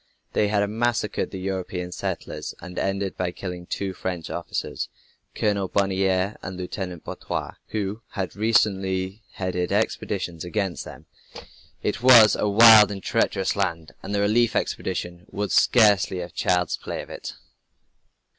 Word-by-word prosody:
They 105 - +2
had 100 0 +1
massacred 115 0 -1
the 95 - -7
European 90 -1 -4
settlers, - - -5
and 90 0 -7
ended 95 0 -1
by 90 -1 -1
killing 90 -1 -7
two 95 -1 -3
French 90 -2 -4
officers, - - -4 0.5
Colonel 100 -2 0
Bonnier 95 0 +1
and 95 -2 -6
Lieutenant 90 -1 -5
Boiteux, - - -4 0.2
who 105 +1 -3
had 95 -2 -3
recently 100 -3 +1
headed 90 -1 -2
expeditions 100 -5 -1
against 95 0 -2
them. - - -11 0.8
It - - -1
was 120 -4 +8
a 105 - 0
wild 110 0 +9
and 95 -1 -6
treacherous 95 -4 +1
land, 85 -5 -2
and 105 - -4
the 100 - +1
relief 110 +3 +2
expedition 90 -1 -3
would 100 -1 -3
scarcely 105 -6 +4
have 90 -1 -6
child's 90 -2 +1
play - - -5
of - - -13
it. - - -7
95 Hz, 140 wpm, -24 LUFS, 90-105 Hz, 0.8 s, wild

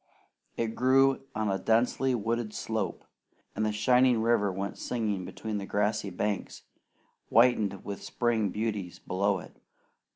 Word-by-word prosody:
It 115 -1 -1
grew 135 +2 +3
on 110 -2 0
a 95 - -1
densely 125 +3 +2
wooded 115 0 -2
slope, 110 -1 -3 0.5
and 110 - -1
the 110 - +1
shining 125 +3 +4
river 115 -4 +2
went 95 +1 -4
singing 105 -6 -2
between 105 0 -4
grassy 105 0 0
banks, 100 +2 -3 0.7
whitened 110 -5 +3
with 100 -1 -5
spring 115 -4 0
beauties, 105 -3 -3
below 100 +2 0
it. - - -12
110 Hz, 130 wpm, -29 LUFS, 100-120 Hz, 0.7 s, shining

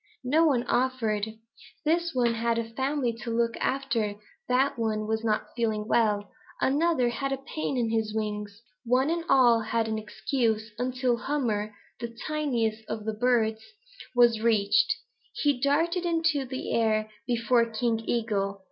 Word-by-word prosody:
"No 305 +6 +3
one 255 -5 +2
offered. 240 -4 0 0.6
This 335 +1 +1
one 240 -2 +2
had 230 0 0
a 230 -1 -2
family 265 0 -1
to - - -5
look 230 0 +1
after. 235 -6 -1 0.3
That 255 0 +2
one 215 -1 -1
was 220 +1 -1
not 215 -1 -1
feeling 220 -3 -1
well. 210 -3 +1 0.3
Another 285 -2 +2
had 275 +3 -3
a 270 - 0
pain 270 0 -4
in 230 -2 0
his 220 -1 0
wings. 210 0 -4 0.2
One 255 +5 +2
and 335 0 -1
all 240 -3 +6
they 215 - -7
had 225 0 0
an 220 0 -1
excuse 220 0 -1
until 250 -1 0
Hummer, 220 -7 -2 0.2
the 230 0 -6
tiniest 240 -8 -1
of 220 - -3
all - - -12
the 220 - -1
birds, 220 -1 +1 0.5
was 235 -2 +5
reached. 225 - +3 0.4
He 285 -4 0
darted 330 +6 +2
into 325 -5 +1
the 260 +1 -4
air 215 -1 +2 0.2
before 235 0 +2
King 225 0 0
Eagle. 210 -4 -1
235 Hz, 155 wpm, -27 LUFS, 220-265 Hz, 0.6 s, all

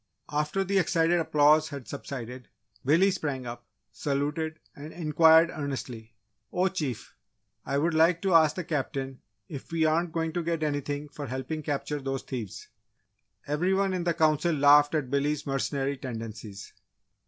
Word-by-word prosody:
After 150 +6 0
the 195 +1 +1
excited 170 0 +2
applause 155 0 +4
had 140 -4 -8
subsided, 125 -3 -7 0.4
Billy 170 +8 +4
sprang 140 -7 -3
up, 120 0 -8 0.2
saluted, 150 +3 -2 0.2
and 150 +2 -9
inquired 160 0 +5
earnestly, 125 -7 -6 0.4
"Oh 185 +1 +1
Chief! 150 - -4 0.5
I 140 - 0
would 165 +4 +1
like 165 +2 +4
to 190 -2 +2
ask 155 -2 +5
the 180 - -3
Captain 135 -4 -3 0.3
if 140 0 -9
we 165 -1 +1
aren't 165 +2 +1
going 160 0 -2
to 175 - -1
get 165 -1 -2
anything 145 0 -2
for 145 0 -7
helping 130 +5 -4
capture 145 0 -3
those 135 0 -3
thieves?" 115 -8 -6 0.8
Every 170 +6 +1
one 195 -1 +1
in 180 -2 -1
the 170 -1 0
Council 155 +1 +2
laughed 145 +1 +5
at 135 -5 -2
Billy's 145 +1 0
mercenary 135 0 -1
tendencies. 110 -5 -7
150 Hz, 155 wpm, -28 LUFS, 135-165 Hz, 0.8 s, inquired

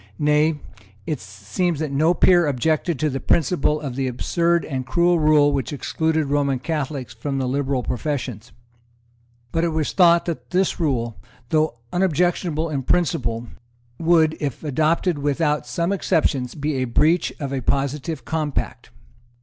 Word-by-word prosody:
Nay, 150 +1 +2 0.5
it 150 -4 -2
seems 105 - -3
that 155 -3 -2
no 155 +5 +3
peer 175 -1 +5
objected 155 +4 0
to 155 - 0
the 135 - -3
principle 150 -1 +1
of 140 -5 -5
the 135 0 -1
absurd 170 +7 0
and 130 -3 -3
cruel 170 +6 +2
rule 150 -1 +4
which 135 -4 -2
excluded 160 +2 -1
Roman 140 -1 +1
Catholics 140 -3 -4
from 135 +4 -4
the 130 -1 -1
liberal 135 -1 -1
professions. 125 -5 -4 1.0
But 165 - 0
it 170 - +2
was 155 -2 -1
thought 170 -2 +5
that 125 -8 -5
this 185 0 0
rule, 120 -8 -1 0.3
though 155 -5 +1 0.2
unobjectionable 175 -2 +1
in 140 -3 -1
principle, 120 -7 0 0.5
would, 160 -2 +3
if 140 -2 -4
adopted 155 +3 +1
without 145 -1 0
some 170 +9 -1
exceptions, 150 -9 0
be 150 -1 -2
a 130 - 0
breach 155 +8 +2
of 140 -2 -4
a 135 - -2
positive 140 +1 -2
compact. 155 -2 -3
150 Hz, 150 wpm, -22 LUFS, 135-165 Hz, 1.0 s, peer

